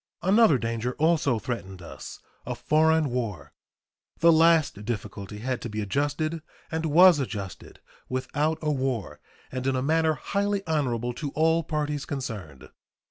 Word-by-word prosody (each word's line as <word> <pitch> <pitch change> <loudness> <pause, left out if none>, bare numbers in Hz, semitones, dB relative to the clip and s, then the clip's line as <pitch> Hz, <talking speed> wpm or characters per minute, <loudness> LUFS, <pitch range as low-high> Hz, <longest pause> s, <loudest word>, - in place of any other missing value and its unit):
Another 195 - +5
danger 115 +1 -3
also 155 -5 +2
threatened 95 -4 -5
us 85 - -9 0.3
a - - -4
foreign 160 -2 +2
war. 105 - -4 0.6
The 170 0 +6
last 160 -9 +4
difficulty 105 -2 -5
had 125 +3 -3
to 120 - -5
be 105 0 -4
adjusted, 145 +9 -1 0.3
and 160 0 -1
was 175 +1 +7
adjusted 100 -8 -6 0.3
without 150 +4 -1
a 150 - +1
war 130 -7 -2 0.3
and 130 0 -3
in 135 - +1
a 130 - -1
manner 160 +2 +2
highly 200 +3 -1
honorable 125 -7 -1
to 145 +4 -4
all 160 +1 +3
parties 150 -2 -2
concerned. 100 - -6
140 Hz, 140 wpm, -26 LUFS, 115-160 Hz, 0.6 s, was